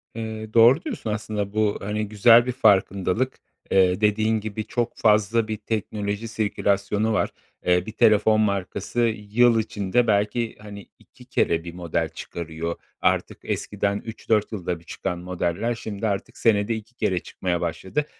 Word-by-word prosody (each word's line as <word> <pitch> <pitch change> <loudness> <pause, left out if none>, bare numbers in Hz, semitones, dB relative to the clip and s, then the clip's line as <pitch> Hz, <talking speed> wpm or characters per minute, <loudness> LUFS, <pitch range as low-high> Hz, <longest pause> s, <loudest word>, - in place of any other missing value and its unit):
Eee, 110 -1 -6
doğru 115 +5 +6
diyorsun 240 - -4
aslında 105 -1 -3
bu, 110 -1 +1
hani, 105 +1 -2
güzel 115 +3 +6
bir 125 - -1
farkındalık. 105 +1 +2 0.3
Eee, 95 0 +3
dediğin 110 +1 +2
gibi 110 0 -5
çok 120 0 -2
fazla 110 +1 +3
bir 110 -1 -3
teknoloji 105 0 -3
sirkülasyonu 105 0 0
var. - - +1 0.4
Eee, 90 0 +3
bir 110 - -6
telefon 110 0 +4
markası 100 +3 -2 0.3
yıl 120 +1 +4
içinde 110 +2 0
belki, 105 +2 +1
hani, 100 -1 -10
2 - - -19
kere 85 0 +1
bir 85 -1 -8
model 85 -2 -2
çıkarıyor. 85 0 -5 0.3
Artık - - +1
eskiden 100 0 -2
3-4 110 -1 -1
yılda 90 -5 -3
bir - - -20
çıkan 90 +1 -4
modeller, 90 +5 -2
şimdi 110 -1 -4
artık 100 -2 -3
senede 110 0 +2
2 110 +2 -10
kere 95 -6 0
çıkmaya 90 0 -3
başladı. 95 - -2
105 Hz, 150 wpm, -24 LUFS, 95-110 Hz, 0.4 s, doğru